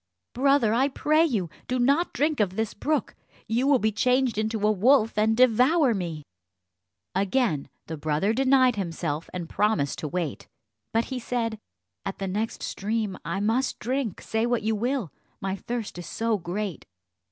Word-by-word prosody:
"Brother, 270 Hz, -4 st, +3 dB
I 260 Hz, +4 st, +3 dB
pray 305 Hz, +3 st, +2 dB
you, 210 Hz, -, 0 dB, 0.2 s
do 255 Hz, -, 0 dB
not 280 Hz, +8 st, +2 dB
drink 295 Hz, -1 st, 0 dB
of 195 Hz, -3 st, +1 dB
this 220 Hz, 0 st, -1 dB
brook; 300 Hz, +7 st, -1 dB, 0.3 s
you 240 Hz, +4 st, 0 dB
will 285 Hz, -2 st, +5 dB
be 220 Hz, -2 st, +1 dB
changed 250 Hz, +1 st, +2 dB
into 215 Hz, -1 st, -1 dB
a 215 Hz, -, +5 dB
wolf, 225 Hz, +3 st, +3 dB
and 220 Hz, +1 st, +2 dB
devour 255 Hz, +3 st, +4 dB
me." 170 Hz, -6 st, -4 dB, 0.9 s
Again 195 Hz, -, 0 dB, 0.2 s
the 160 Hz, -, -6 dB
brother 155 Hz, +8 st, 0 dB
denied 260 Hz, -1 st, +4 dB
himself 165 Hz, -4 st, -3 dB
and 175 Hz, -2 st, -5 dB
promised 210 Hz, -10 st, 0 dB
to 155 Hz, -, -3 dB
wait; 165 Hz, -2 st, -3 dB, 0.4 s
but 225 Hz, +1 st, +1 dB
he 255 Hz, -, -2 dB
said, 230 Hz, -2 st, -2 dB, 0.4 s
"At 195 Hz, -, -4 dB
the 195 Hz, -, -3 dB
next 210 Hz, +4 st, -3 dB
stream 210 Hz, -1 st, -2 dB
I 195 Hz, -, -2 dB
must 235 Hz, +5 st, +1 dB
drink, 250 Hz, -4 st, -2 dB
say 225 Hz, +1 st, 0 dB
what 240 Hz, -3 st, 0 dB
you 220 Hz, +1 st, +1 dB
will, 235 Hz, -, -1 dB, 0.3 s
my 195 Hz, 0 st, -2 dB
thirst 225 Hz, -3 st, -5 dB
is 175 Hz, -, -7 dB
so 225 Hz, -2 st, -1 dB
great." 185 Hz, -1 st, -4 dB
220 Hz, 165 wpm, -26 LUFS, 195-255 Hz, 0.9 s, will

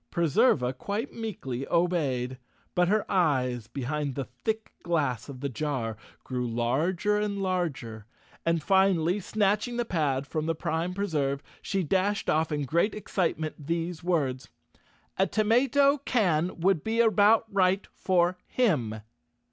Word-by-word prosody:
Preserva 150 Hz, -, +3 dB
quite 205 Hz, -, -4 dB
meekly 140 Hz, -, -5 dB
obeyed, 140 Hz, -8 st, 0 dB, 0.3 s
but 180 Hz, 0 st, +3 dB
her 210 Hz, +3 st, +2 dB
eyes, 130 Hz, -, +1 dB
behind 140 Hz, +1 st, -3 dB
the 135 Hz, -, -3 dB
thick 215 Hz, -, -4 dB
glass 150 Hz, -8 st, -1 dB
of 130 Hz, -2 st, -8 dB
the 140 Hz, -, -1 dB
jar, 130 Hz, -4 st, -2 dB, 0.3 s
grew 125 Hz, -1 st, -3 dB
larger 160 Hz, -, 0 dB
and 205 Hz, -1 st, -2 dB
larger, 150 Hz, -, -2 dB, 0.4 s
and 165 Hz, -2 st, +1 dB
finally, 190 Hz, -1 st, +3 dB
snatching 210 Hz, +4 st, 0 dB
the 240 Hz, -, 0 dB
pad 145 Hz, -8 st, 0 dB
from 155 Hz, +3 st, -3 dB
the 165 Hz, -, 0 dB
Prime 165 Hz, +3 st, -2 dB
Preserve, 145 Hz, -8 st, -1 dB, 0.2 s
she 195 Hz, -1 st, -1 dB
dashed 190 Hz, +5 st, +1 dB
off 160 Hz, +1 st, +1 dB
in 145 Hz, -1 st, -1 dB
great 170 Hz, -, +1 dB
excitement 160 Hz, -7 st, -2 dB
these 170 Hz, 0 st, -2 dB
words, 140 Hz, -7 st, -1 dB, 0.7 s
"A 190 Hz, -, +4 dB
tomato 270 Hz, +6 st, +3 dB
can 185 Hz, -, +1 dB
would 180 Hz, -2 st, +2 dB
be 225 Hz, +1 st, -1 dB
about 220 Hz, 0 st, +5 dB
right 190 Hz, 0 st, +2 dB
for 180 Hz, -1 st, +1 dB
him!" 125 Hz, -, 0 dB
170 Hz, 135 wpm, -28 LUFS, 140-200 Hz, 0.7 s, about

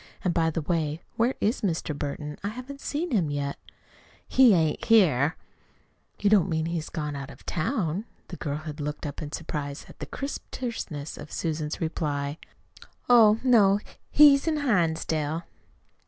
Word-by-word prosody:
"And, 180 Hz, -, +1 dB
by 165 Hz, -1 st, +2 dB
the 160 Hz, 0 st, -3 dB
way, 160 Hz, -1 st, -1 dB
where 235 Hz, +3 st, +2 dB
is 220 Hz, +5 st, 0 dB
Mr. 165 Hz, -6 st, -1 dB
Burton? 150 Hz, +1 st, -4 dB
I -, -, -1 dB
haven't 255 Hz, +6 st, -7 dB
seen 315 Hz, +4 st, -2 dB
him 185 Hz, -, +2 dB
yet." 140 Hz, -1 st, -3 dB, 0.7 s
"He 250 Hz, -6 st, +6 dB
ain't 160 Hz, +5 st, +1 dB
here." 165 Hz, -, +4 dB, 0.8 s
"You 205 Hz, -, 0 dB
don't 200 Hz, -3 st, +4 dB
mean 160 Hz, -1 st, 0 dB
he 170 Hz, +1 st, -2 dB
has 155 Hz, -, -5 dB
gone 150 Hz, -2 st, -4 dB
out 140 Hz, -1 st, -6 dB
of -, -, -14 dB
town?" 180 Hz, -, -1 dB, 0.2 s
The 175 Hz, -, -6 dB
girl 145 Hz, -4 st, -3 dB
had 155 Hz, 0 st, -7 dB
looked 150 Hz, +1 st, -4 dB
up 145 Hz, +1 st, -5 dB
in 150 Hz, -1 st, -6 dB
surprise 145 Hz, -3 st, -5 dB
at -, -, -15 dB
the -, -, -6 dB
crisp 275 Hz, +1 st, -5 dB
terseness 175 Hz, -, -5 dB
of 150 Hz, -, -9 dB
Susan's 155 Hz, -2 st, -3 dB
reply. 145 Hz, -3 st, -2 dB, 0.7 s
"Oh, 225 Hz, -3 st, +7 dB
no, 210 Hz, -6 st, +5 dB, 0.3 s
he's 285 Hz, 0 st, +6 dB
in 310 Hz, -2 st, +1 dB
Hinsdale." 160 Hz, -, 0 dB
165 Hz, 165 wpm, -27 LUFS, 150-220 Hz, 0.8 s, Oh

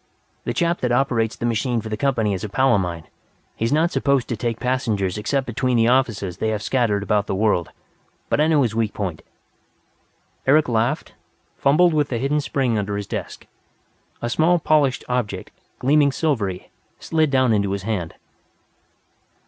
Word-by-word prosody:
The -, -, -1 dB
chap 170 Hz, -1 st, +1 dB
that 125 Hz, -, 0 dB
operates 120 Hz, -3 st, +1 dB
the -, -, -4 dB
machine 120 Hz, +1 st, 0 dB
for 110 Hz, 0 st, -6 dB
the 110 Hz, -, -2 dB
company 115 Hz, -4 st, 0 dB
is 95 Hz, -, -4 dB
a 105 Hz, -, -4 dB
pal 130 Hz, +4 st, +3 dB
of 100 Hz, -, +3 dB
mine. 85 Hz, -3 st, -4 dB, 0.5 s
He's 115 Hz, +1 st, -1 dB
not 160 Hz, +4 st, +2 dB
supposed 140 Hz, -3 st, +1 dB
to 120 Hz, -, -1 dB
take 115 Hz, 0 st, -3 dB
passengers 110 Hz, -7 st, -1 dB
except 135 Hz, +6 st, -1 dB
between 125 Hz, +1 st, 0 dB
the 115 Hz, 0 st, +4 dB
offices 110 Hz, -8 st, 0 dB
they 110 Hz, -, -1 dB
have 105 Hz, -2 st, -2 dB
scattered 115 Hz, -6 st, +1 dB
about 105 Hz, 0 st, 0 dB
the -, -, -1 dB
world. 100 Hz, -5 st, +1 dB, 0.6 s
But -, -, +1 dB
I 155 Hz, -, +4 dB
know 155 Hz, -3 st, +3 dB
his 115 Hz, -3 st, -1 dB
weak 110 Hz, -2 st, -1 dB
point 90 Hz, -6 st, -4 dB, 0.7 s
" -, -, -38 dB
Eric 150 Hz, +3 st, +5 dB
laughed, 120 Hz, +5 st, -1 dB, 0.4 s
fumbled 165 Hz, +5 st, +3 dB
with 150 Hz, -3 st, +1 dB
a 120 Hz, -, 0 dB
hidden 140 Hz, +5 st, 0 dB
spring 130 Hz, -6 st, 0 dB
under 100 Hz, 0 st, -3 dB
his 100 Hz, -, -4 dB
desk. -, -, -6 dB, 0.8 s
A 120 Hz, -, -1 dB
small 170 Hz, +5 st, +3 dB
polished 150 Hz, -5 st, +2 dB
object, 110 Hz, -7 st, -3 dB, 0.3 s
gleaming 145 Hz, +2 st, +3 dB
silvery, 110 Hz, -, -2 dB, 0.3 s
slid 160 Hz, -2 st, +1 dB
down 130 Hz, -4 st, +3 dB
into 100 Hz, -2 st, +1 dB
his 100 Hz, -1 st, -3 dB
hand. 95 Hz, -6 st, -3 dB
120 Hz, 180 wpm, -22 LUFS, 105-140 Hz, 0.8 s, Eric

